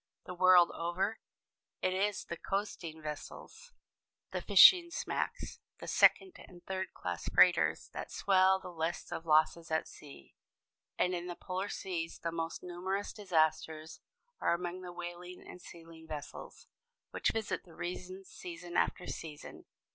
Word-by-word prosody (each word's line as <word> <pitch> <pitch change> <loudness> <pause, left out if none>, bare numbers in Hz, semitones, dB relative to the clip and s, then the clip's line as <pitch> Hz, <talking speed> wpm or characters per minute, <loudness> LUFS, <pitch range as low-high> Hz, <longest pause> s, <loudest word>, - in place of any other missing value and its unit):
The 180 - -6
world 180 -1 +6
over, 185 +6 -2 0.6
it 185 - +2
is 200 +2 0
the 170 - -5
coasting 170 -5 -4
vessels, 155 - -8 0.6
the - - -3
fishing 350 -2 +8
smacks, - - -3 0.2
the - - -8
second 375 -3 +4
and 175 -1 -15
third 190 0 -3
class - - -4
freighters - - +4
that - - -6
swell 190 -1 +4
the 180 - -9
lists 165 0 -3
of 165 - -5
losses 160 +2 +3
at 160 0 0
sea. 140 - -14 0.6
And 180 - +2
in 175 0 -3
the 175 - -5
polar 185 +3 -4
seas 165 -3 -4
the 165 - -3
most 165 0 -4
numerous 185 +3 -3
disasters 160 -4 0 0.4
are - - +2
among 180 +1 -5
the 180 -1 -7
whaling 175 +1 -8
and 180 - -11
sealing 165 -2 -13
vessels, 150 -2 -8 0.5
which - - +1
visit 220 -2 -2
the 170 - -17
regions 185 +2 -6
season 175 0 -9
after 180 - +1
season. 150 -2 -8
175 Hz, 145 wpm, -33 LUFS, 165-185 Hz, 0.6 s, fishing